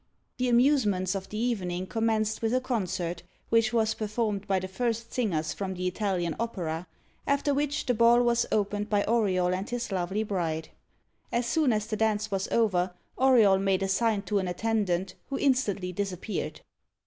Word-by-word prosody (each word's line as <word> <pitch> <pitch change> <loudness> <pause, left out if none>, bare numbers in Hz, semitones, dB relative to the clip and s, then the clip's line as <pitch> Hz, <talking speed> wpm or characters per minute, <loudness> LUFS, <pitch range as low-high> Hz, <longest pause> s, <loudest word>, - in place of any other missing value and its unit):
The 250 0 +1
amusements 235 -7 +3
of 195 -1 -5
the 210 - -5
evening 185 -6 -1
commenced 220 +1 0
with 225 +2 +1
a - - +3
concert, 185 -9 -2 0.3
which 225 -1 +3
was 225 -2 +2
performed 215 -2 -2
by 195 - +2
the 185 0 -3
first 230 +3 -2
singers 160 -10 0
from 190 -2 -4
the 180 0 -4
Italian 180 -3 -1
Opera; 180 -7 -3 0.4
after 280 0 +2
which, 290 +1 -1
the 250 - +2
ball 235 +1 +5
was 240 0 +2
opened 205 0 0
by 205 -1 +2
Auriol 190 -6 +2
and 190 +3 -3
his 240 -2 -3
lovely 190 +3 -1
bride. 165 -6 -2 0.6
As 235 0 0
soon 300 +1 +2
as 210 -1 0
the 215 -1 -3
dance 215 -1 0
was 195 -1 -1
over, 185 -5 +1 0.2
Auriol 230 -7 +5
made 195 0 +1
a - - 0
sign 210 +1 +1
to 210 -2 0
an 190 - -2
attendant, 190 -2 -1 0.2
who 275 - -2
instantly 215 -9 +1
disappeared. 195 +2 -4
210 Hz, 170 wpm, -28 LUFS, 185-235 Hz, 0.6 s, ball